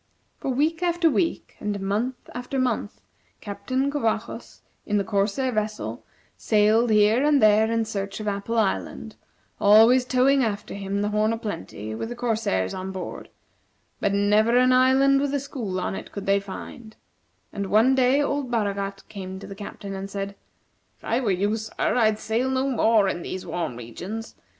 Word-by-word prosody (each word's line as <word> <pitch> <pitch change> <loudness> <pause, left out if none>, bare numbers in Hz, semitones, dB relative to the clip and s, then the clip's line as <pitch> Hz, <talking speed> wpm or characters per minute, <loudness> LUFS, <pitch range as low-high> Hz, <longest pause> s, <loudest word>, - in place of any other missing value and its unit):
For - - -3
week 310 +6 0
after 345 -2 +2
week, 330 +3 -1
and 210 -1 -3
month 215 +6 -2
after 245 +2 -4
month, 245 -5 -1 0.4
Captain 255 +7 -2
Covajos, 230 -4 -3 0.2
in 210 - 0
the 200 - +1
corsair 210 +6 0
vessel, 215 -1 -3 0.3
sailed 220 +2 +3
here 215 +4 +4
and 295 -1 +4
there 215 0 +4
in 230 -1 +1
search 200 -2 -4
of 215 - -5
Apple 205 +3 -2
Island, 215 -4 -1 0.4
always 225 +5 +6
towing 260 +2 +3
after 205 -3 -3
him 200 0 -3
the 210 - 0
"Horn 215 +1 +1
o' - - -2
Plenty," 110 - -6
with 170 - -4
the 240 - -5
corsairs 220 - -1
on 190 +1 -5
board, 190 -1 -7 0.7
but 200 - +1
never 210 +4 +3
an 255 0 +5
island 265 +2 +4
with 285 0 -1
a - - +1
school 235 -9 -4
on - - -2
it - - -7
could 200 -1 -6
they 200 0 +3
find; 215 +3 -9 0.6
and 200 -1 -3
one 225 +7 +4
day 265 +2 +3
old 285 -2 -2
Baragat 200 -3 -2
came 190 -2 -7
to 190 - -9
the - - -8
Captain 200 0 -8
and 195 0 -5
said: 200 0 -4 0.6
"If - - -32
I 235 - 0
were 245 -5 -1
you, 200 +3 +1
sir, 220 0 -8 0.2
I'd 220 -3 +3
sail 230 +4 -1
no 265 +1 0
more 225 -5 +3
in 175 -2 -2
these 185 +2 -6
warm 165 -8 -3
regions. 180 - -7
215 Hz, 175 wpm, -24 LUFS, 200-255 Hz, 0.7 s, always